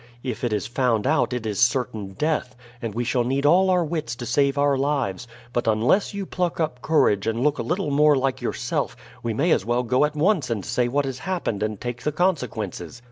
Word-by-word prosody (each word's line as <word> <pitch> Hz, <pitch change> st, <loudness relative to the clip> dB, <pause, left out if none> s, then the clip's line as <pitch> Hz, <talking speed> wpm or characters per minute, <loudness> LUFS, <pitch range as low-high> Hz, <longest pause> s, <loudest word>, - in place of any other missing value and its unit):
If 125 Hz, -3 st, -4 dB
it 120 Hz, -, 0 dB
is 105 Hz, -2 st, -1 dB
found 120 Hz, -2 st, 0 dB
out 155 Hz, +1 st, +2 dB
it 125 Hz, -2 st, -3 dB
is 105 Hz, -3 st, -2 dB
certain 120 Hz, -5 st, 0 dB
death, 150 Hz, -1 st, -1 dB, 0.3 s
and 115 Hz, -3 st, -4 dB
we 120 Hz, -, 0 dB
shall 120 Hz, +1 st, +1 dB
need 135 Hz, +3 st, -1 dB
all 185 Hz, +5 st, +5 dB
our 180 Hz, -2 st, +3 dB
wits 155 Hz, -7 st, -3 dB
to 120 Hz, -, -7 dB
save 140 Hz, +3 st, +1 dB
our 140 Hz, 0 st, +3 dB
lives; 135 Hz, -7 st, -1 dB, 0.3 s
but 120 Hz, -, -1 dB
unless 115 Hz, -, +2 dB
you 200 Hz, -1 st, -4 dB
pluck 180 Hz, -2 st, -2 dB
up 140 Hz, -6 st, -2 dB
courage 105 Hz, -10 st, +2 dB
and 115 Hz, +2 st, 0 dB
look 150 Hz, 0 st, +1 dB
a -, -, +1 dB
little 175 Hz, -3 st, -1 dB
more 150 Hz, +1 st, +5 dB
like 135 Hz, -1 st, -1 dB
yourself, -, -, -2 dB, 0.3 s
we 115 Hz, -2 st, -2 dB
may 160 Hz, +8 st, +2 dB
as -, -, +3 dB
well 120 Hz, +3 st, 0 dB
go 125 Hz, +3 st, +2 dB
at 150 Hz, 0 st, 0 dB
once 160 Hz, -3 st, +2 dB
and 105 Hz, -5 st, -2 dB
say 125 Hz, -1 st, 0 dB
what 140 Hz, +3 st, 0 dB
has 135 Hz, -1 st, -4 dB
happened 170 Hz, -, -2 dB
and 105 Hz, -1 st, -2 dB
take 120 Hz, -1 st, -5 dB
the 150 Hz, -, -1 dB
consequences. 125 Hz, -, -2 dB
130 Hz, 225 wpm, -24 LUFS, 115-150 Hz, 0.3 s, all